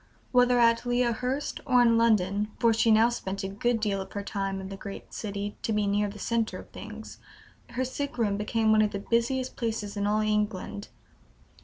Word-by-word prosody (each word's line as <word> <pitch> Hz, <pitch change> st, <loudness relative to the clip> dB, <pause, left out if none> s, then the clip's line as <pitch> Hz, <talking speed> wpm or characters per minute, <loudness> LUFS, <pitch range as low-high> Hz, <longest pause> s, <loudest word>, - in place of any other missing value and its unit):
Whether 250 Hz, -1 st, +4 dB
at 230 Hz, -1 st, +4 dB
Lea 245 Hz, 0 st, +1 dB
Hurst 255 Hz, +5 st, -2 dB
or 250 Hz, -2 st, +3 dB
in 230 Hz, -1 st, +4 dB
London 210 Hz, -3 st, +2 dB
(for 230 Hz, -1 st, +4 dB
she 225 Hz, +1 st, +2 dB
now 220 Hz, +2 st, +6 dB
spent 195 Hz, -5 st, -4 dB
a -, -, -1 dB
good 225 Hz, +4 st, 0 dB
deal 205 Hz, -3 st, 0 dB
of 200 Hz, +1 st, -6 dB
time 195 Hz, -1 st, -2 dB
in 190 Hz, 0 st, -7 dB
the 195 Hz, -, -6 dB
great 195 Hz, 0 st, -9 dB
city, 205 Hz, -1 st, -4 dB
to -, -, -2 dB
be 210 Hz, -1 st, +1 dB
near 205 Hz, +1 st, +1 dB
the 205 Hz, -, -9 dB
centre 230 Hz, +1 st, -1 dB
of -, -, -12 dB
things), -, -, -9 dB, 0.5 s
her 250 Hz, +2 st, -2 dB
sick 280 Hz, +1 st, -4 dB
room 210 Hz, -4 st, +1 dB
became 220 Hz, +1 st, +1 dB
one 215 Hz, 0 st, +5 dB
of 210 Hz, -1 st, +1 dB
the 200 Hz, 0 st, -5 dB
busiest 255 Hz, +3 st, +1 dB
places 220 Hz, -3 st, -3 dB
in 205 Hz, 0 st, -1 dB
all 210 Hz, +1 st, +2 dB
England. 210 Hz, -2 st, -1 dB
215 Hz, 200 wpm, -28 LUFS, 205-235 Hz, 0.5 s, now